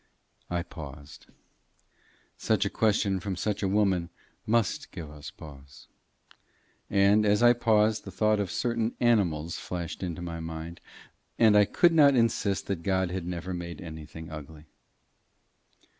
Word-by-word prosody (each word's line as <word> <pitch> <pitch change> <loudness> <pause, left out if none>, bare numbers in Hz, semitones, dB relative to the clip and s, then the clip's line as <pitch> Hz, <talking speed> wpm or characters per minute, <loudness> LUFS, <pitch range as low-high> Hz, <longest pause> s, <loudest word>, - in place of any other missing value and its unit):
I 85 -1 -1
paused. 70 -3 -11 1.1
Such 105 -2 +1
a 100 - -2
question 100 -3 +1
from 95 +1 -4
such 100 +3 -2
a 100 - +1
woman 95 -4 +1 0.4
"must 115 -3 0
give 80 -3 -8
us 75 0 -9
pause." 70 -3 -14 1.0
And, 100 +2 +4
as 105 +2 +3
I 120 0 +7
paused, 110 -2 +2
the - - -8
thought 105 +3 +1
of 100 -3 -1
certain 115 +1 -1
animals 85 -9 +1
flashed 85 -3 -5
into 90 -2 -4
my 85 -1 -5
mind 80 +1 -7 0.6
and 110 -2 +5
I 105 0 +6
could 170 - +3
not 145 -4 +6
insist 115 -4 +1
that 95 -4 -3
God 95 0 0
had 90 -2 -4
never 90 +1 -4
made 85 -1 -6
anything 80 -1 -9
ugly. 75 0 -10
95 Hz, 145 wpm, -28 LUFS, 80-105 Hz, 1.1 s, I